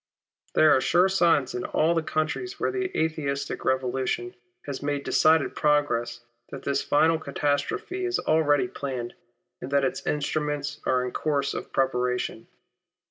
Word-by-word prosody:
There 155 - +6
are 130 - +2
sure 180 +6 +4
signs 170 -8 +2
in 125 - -3
all 160 +2 +1
the 165 - +1
countries 155 - -2
where - - 0
the 380 -1 -2
Atheistic 140 -3 -2
Revolution 130 -2 -1 0.3
has 140 -2 -5
made 145 -1 -2
decided 160 -1 +3
progress, 130 -6 +1 0.3
that - - -8
this 140 0 0
final 160 +2 +3
catastrophe 145 - -2
is 365 0 -1
planned - - -8
already, 155 +3 +3 0.9
and 130 - -6
that 140 -1 +3
its 130 - -2
instruments 150 0 -2
are 125 0 +2
in 125 - -4
course 140 -1 -1
of - - -6
preparation. 125 -3 -1
145 Hz, 145 wpm, -26 LUFS, 130-160 Hz, 0.9 s, There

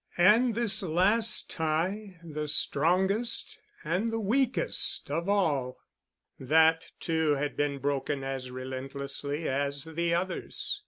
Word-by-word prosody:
And 215 +6 +5
this 235 -3 +2
last 195 +6 +3
tie—the 165 -1 -3
strongest 190 +10 +1 0.2
and 180 +9 -1
the 225 0 -2
weakest 245 - 0
of 170 +5 -2
all—that 160 -1 0
too 160 -3 +1
had 145 +1 -3
been 145 -1 -1
broken 140 0 -2
as 135 -1 -4
relentlessly 135 +4 -4
as 140 +1 -1
the 170 +1 -2
others. 190 - -3
160 Hz, 105 wpm, -29 LUFS, 140-195 Hz, 0.2 s, And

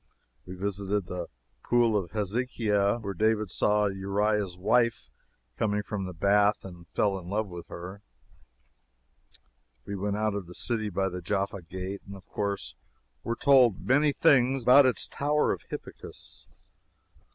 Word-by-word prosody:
We 90 - -7
visited 100 +1 -2
the 90 -1 -5 0.4
pool 120 -2 +3
of 95 -4 -1
Hezekiah, 105 +1 0
where 100 -2 -4
David 110 0 +1
saw 105 +2 +2
Uriah's 100 0 -1
wife 115 +5 +1 0.5
coming 105 -1 0
from 100 -1 -4
the 90 - -6
bath 100 +4 +2
and 90 -2 -11
fell 100 -2 0
in 90 -1 -10
love 105 +2 0
with 85 -1 -9
her. 95 +4 -8 1.8
We 100 - -5
went 100 +1 -2
out 110 -1 0
of 100 -4 -5
the 90 - -10
city 110 -3 -1
by 95 0 -1
the 90 0 -6
Jaffa 100 +1 -2
gate, 95 +3 -6
and 100 - -8
of 95 - -14
course 100 -2 -3 0.5
were 115 - -2
told 125 -8 +4
many 145 +3 +4
things 130 -2 +3
about 130 +3 +7
its 125 - 0
Tower 150 +1 +1
of - - -3
Hippicus. - - -9
100 Hz, 150 wpm, -28 LUFS, 95-110 Hz, 1.8 s, about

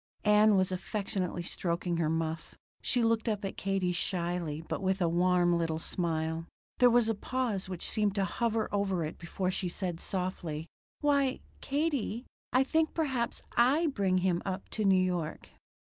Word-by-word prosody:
Ann 210 0 +6
was 185 0 +2
affectionately 185 -2 -2
stroking 170 0 -2
her 165 -2 +1
muff. 160 0 -2 0.3
She 245 -2 +2
looked 225 0 +2
up 205 -2 -2
at 195 - -4
Katie 195 -2 0
shyly, 175 -3 -2
but - - -3
with 190 0 +1
a 175 - +2
warm 175 +1 +3
little 165 -2 0
smile. 160 -1 -2 0.3
There 250 -1 +7
was 240 -1 +4
a 225 - +2
pause 220 -3 -2
which 180 -3 -2
seemed 210 -2 +1
to 195 -2 +2
hover 225 +4 0
over 195 -4 0
it 155 - -7
before 185 +2 -2
she 185 -1 -2
said 175 -2 -3
softly: 175 -5 -3 0.4
"Why, 280 -3 +2 0.2
Katie, 275 -5 -1 0.3
I 255 +2 +4
think 315 +3 +1
perhaps 265 -7 -1
I 270 +8 +4
bring 190 -4 +2
him 175 -2 +2
up 190 0 -4
to 215 - -2
New 190 -1 +5
York." 180 -4 -2
190 Hz, 165 wpm, -31 LUFS, 175-225 Hz, 0.4 s, There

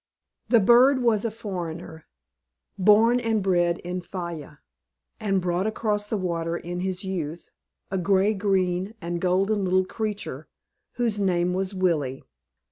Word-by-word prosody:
The 235 - +6
bird 250 +5 +5
was 225 -2 +2
a - - +1
foreigner, 175 -7 -7 0.7
born 215 +5 +5
and 225 -4 0
bred 175 -2 +2
in 180 +1 -4
Fayal, 170 -5 -7 0.6
and 195 -2 +1
brought 180 +2 0
across 210 -1 -1
the 215 - -1
water 170 -2 -2
in 175 +1 -5
his 185 0 -2
youth, 170 -4 -5 0.4
a 190 - 0
gray 195 +3 +3
green 190 0 0
and 170 -2 -4
golden 195 +3 +1
little 185 0 +2
creature, 215 +1 -4 0.5
whose 230 -4 -1
name 180 -2 +1
was 190 +1 -2
Willie. 155 -8 0
190 Hz, 135 wpm, -25 LUFS, 175-210 Hz, 0.7 s, The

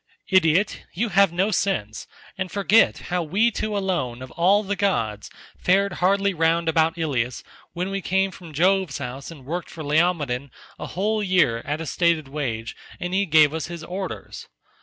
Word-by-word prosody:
Idiot, 185 +1 +2
you 225 +6 0
have 195 -1 +4
no 190 +5 +1
sense, 165 - -1 0.3
and 185 -1 -4
forget 205 +2 +4 0.2
how 180 - +2
we 195 +9 +2
two 215 -1 -2
alone 150 -11 -2
of 130 - -10
all 195 +5 +3
the 200 0 -2
gods 115 - -1 0.3
fared 195 +1 +2
hardly 200 +2 +2
round 165 0 +1
about 160 +1 +2
Ilius 130 -7 -2 0.3
when 180 +2 -3
we 195 0 -2
came 190 +1 +1
from 175 -3 -12
Jove's 180 0 +2
house 135 0 -6
and 150 -6 -12
worked 170 +5 -4
for 160 - -8
Laomedon 145 -4 +1 0.3
a - - -5
whole 210 +3 -1
year 180 - +2
at 150 +3 -3
a - - -4
stated 165 -2 +1
wage 125 -6 -4 0.2
and 180 +1 -4
he 195 +1 +1
gave 155 -2 +5
us 160 -1 -3
his 170 -1 -7
orders. 185 +3 -6
170 Hz, 175 wpm, -23 LUFS, 150-195 Hz, 0.3 s, gave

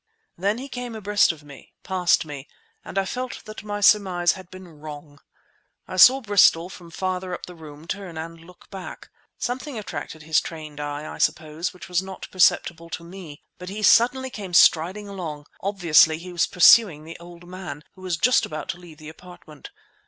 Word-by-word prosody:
Then 200 +4 0
he 265 +3 -7
came 245 -3 -6
abreast 205 -2 +2
of 160 -3 -13
me, 140 -2 -15
passed 180 -3 +2
me, 145 -2 -8 0.4
and - - -8
I 195 - +2
felt 250 +5 -5
that 215 0 -9
my 205 0 -4
surmise 190 -4 +4
had 185 -2 -10
been 185 0 -11
wrong. 150 -2 -11 0.7
I 185 - -6
saw 260 +8 +8
Bristol, 190 -5 +4
from 175 -2 -12
farther 185 +1 -3
up - - -9
the 180 - -11
room, 155 -2 -12
turn 185 -2 -6
and 165 +1 -7
look 175 +1 -17
back. 190 -2 -9 0.3
Something 255 +2 -4
attracted 160 -6 -7
his 155 0 +2
trained 155 -3 -9
eye, 145 0 -4
I - - -9
suppose, 155 +2 -1
which 180 - -12
was 180 -1 +1
not 190 0 -9
perceptible 170 -2 +2
to 165 +1 -6
me. 170 -4 -11 0.2
But 180 0 -8
he 210 +2 -6
suddenly 255 +5 +4
came 195 -6 -6
striding 180 +6 +4
along. 165 -7 -6 0.2
Obviously 170 -5 +4
he 180 +2 -9
was 170 -2 +2
pursuing 180 -3 +6
the 165 +1 -10
old 175 0 -13
man, 180 -5 -8
who 185 - -17
was 180 -3 -2
just 250 +9 +3
about 155 0 -6
to 170 - -4
leave 170 -3 -14
the 155 -1 -12
apartment. 160 -2 -13
180 Hz, 190 wpm, -24 LUFS, 160-195 Hz, 0.7 s, saw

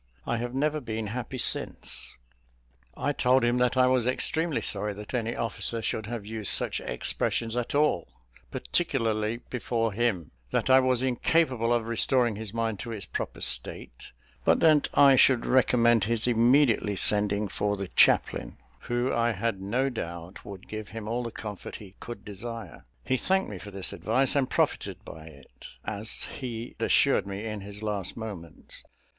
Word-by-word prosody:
I 120 - -1
have 120 +2 -4
never 150 +2 0
been 110 -3 -4
happy 125 +4 -5
since." 120 - -3 0.8
I 145 +3 0
told 130 -1 +3
him 120 +1 +2
that 125 +1 +2
I 130 - +6
was 125 -2 +2
extremely 160 +5 -1
sorry 105 +1 0
that 105 +4 -9
any 115 -2 -1
officer 115 0 -3
should 110 0 -2
have 115 -3 -5
used 110 -1 +1
such - - +1
expressions 115 - -1
at 125 +2 -2
all, 145 - +2 0.4
particularly 115 - -1
before 115 -3 -1
him; 105 -8 -1 0.2
that 130 - +1
I 130 - +8
was 130 -1 +2
incapable 130 -2 +1
of 120 -2 +2
restoring 115 0 +2
his 110 -1 -6
mind 115 -2 -2
to 120 - -6
its 105 -4 -5
proper - - -5
state; - - -1 0.3
but - - +4
that 155 -3 +5
I 140 -1 +7
should 130 -2 +5
recommend 120 -4 +4
his 115 0 0
immediately 120 -2 +3
sending 105 +1 +2
for 100 +1 -1
the 100 -1 -4
chaplain, - - +3 0.2
who, 120 +1 -1
I 115 0 +2
had 105 -1 -2
no 125 +8 0
doubt, 85 -6 -7
would 100 -1 -10
give 110 -1 -6
him 110 -1 -7
all 120 +2 -1
the 120 - -4
comfort 105 -3 -7
he 95 -3 -11
could 115 -3 -8
desire. 115 +3 -7 0.2
He 130 - +1
thanked 190 - 0
me 95 - -6
for 105 - -9
this 95 -2 -2
advice, 130 +6 +1
and 135 -3 +2
profited - - -1
by 80 0 -10
it, 75 -4 -14 0.2
as 110 +2 -3
he 120 -4 -6
assured - - +3
me 100 +2 -5
in 105 -2 -4
his 100 +2 -8
last 105 -2 -2
moments. 100 -8 -8
115 Hz, 170 wpm, -27 LUFS, 105-125 Hz, 0.8 s, I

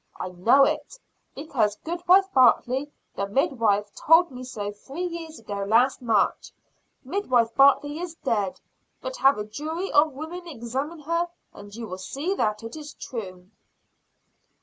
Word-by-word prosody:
I 185 - -4
know 225 +10 +4
it, 305 - -3 0.4
because 240 -8 -1
goodwife 355 +3 +3
Bartley, 260 +2 +3 0.2
the 200 +1 -2
midwife, 210 -3 +1
told 330 +1 +4
me 255 0 -8
so 210 -5 -5
three 270 - -7
years 335 -2 -6
ago 205 -2 -5
last 235 +7 +3
March. 225 -5 +1 0.5
Midwife 255 - +1
Bartley 285 +3 +4
is 345 -2 -6
dead; 205 - -1 0.4
but - - -6
have 270 -2 +4
a 210 - -3
jury 315 - -4
of 300 0 +4
women 335 +5 -7
examine 275 +4 -5
her, 335 +3 0 0.3
and 205 0 -12
you 230 0 -6
will 185 -3 -7
see 280 - -3
that 215 - -1
it 225 +4 -7
is 300 -1 -9
true." 185 -5 -8
265 Hz, 150 wpm, -25 LUFS, 215-315 Hz, 0.5 s, know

